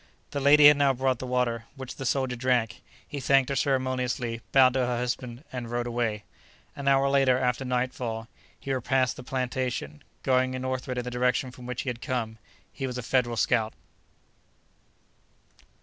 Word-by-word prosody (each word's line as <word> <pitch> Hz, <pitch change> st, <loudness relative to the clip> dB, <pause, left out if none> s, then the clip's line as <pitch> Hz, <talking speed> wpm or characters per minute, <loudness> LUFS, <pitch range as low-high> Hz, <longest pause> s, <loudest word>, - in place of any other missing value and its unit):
The 140 Hz, -, -2 dB
lady 145 Hz, +2 st, +6 dB
had 150 Hz, -1 st, +7 dB
now 140 Hz, -1 st, +4 dB
brought 130 Hz, -1 st, 0 dB
the 130 Hz, -, -5 dB
water, 120 Hz, -2 st, 0 dB
which 130 Hz, -2 st, -8 dB
the 135 Hz, -, -3 dB
soldier 130 Hz, -1 st, 0 dB
drank. 120 Hz, -2 st, 0 dB, 0.3 s
He 145 Hz, -, -5 dB
thanked 135 Hz, 0 st, +3 dB
her 140 Hz, -, -1 dB
ceremoniously, 130 Hz, -3 st, -1 dB
bowed 130 Hz, -2 st, +6 dB
to 130 Hz, -, 0 dB
her 125 Hz, -1 st, 0 dB
husband 125 Hz, +1 st, -4 dB
and 120 Hz, -2 st, -5 dB
rode 120 Hz, 0 st, -2 dB
away. 115 Hz, -3 st, -2 dB, 0.5 s
An 140 Hz, -1 st, -6 dB
hour 135 Hz, 0 st, +4 dB
later, 135 Hz, -2 st, +4 dB
after 125 Hz, 0 st, 0 dB
nightfall, 125 Hz, -3 st, -2 dB, 0.3 s
he 135 Hz, -, -3 dB
repassed 130 Hz, 0 st, +1 dB
the -, -, -9 dB
plantation, 125 Hz, -, -3 dB, 0.2 s
going 130 Hz, 0 st, +2 dB
northward 130 Hz, 0 st, -3 dB
in 125 Hz, -, -1 dB
the 125 Hz, -, -5 dB
direction 125 Hz, +1 st, 0 dB
from 125 Hz, -1 st, -11 dB
which 125 Hz, -1 st, -3 dB
he 135 Hz, -, -2 dB
had 120 Hz, -1 st, -5 dB
come. 115 Hz, -5 st, -3 dB, 0.3 s
He 135 Hz, -, -3 dB
was 125 Hz, -1 st, -5 dB
a 125 Hz, -, -4 dB
Federal 120 Hz, -1 st, +1 dB
scout. 110 Hz, -2 st, +1 dB
125 Hz, 175 wpm, -27 LUFS, 120-130 Hz, 0.5 s, had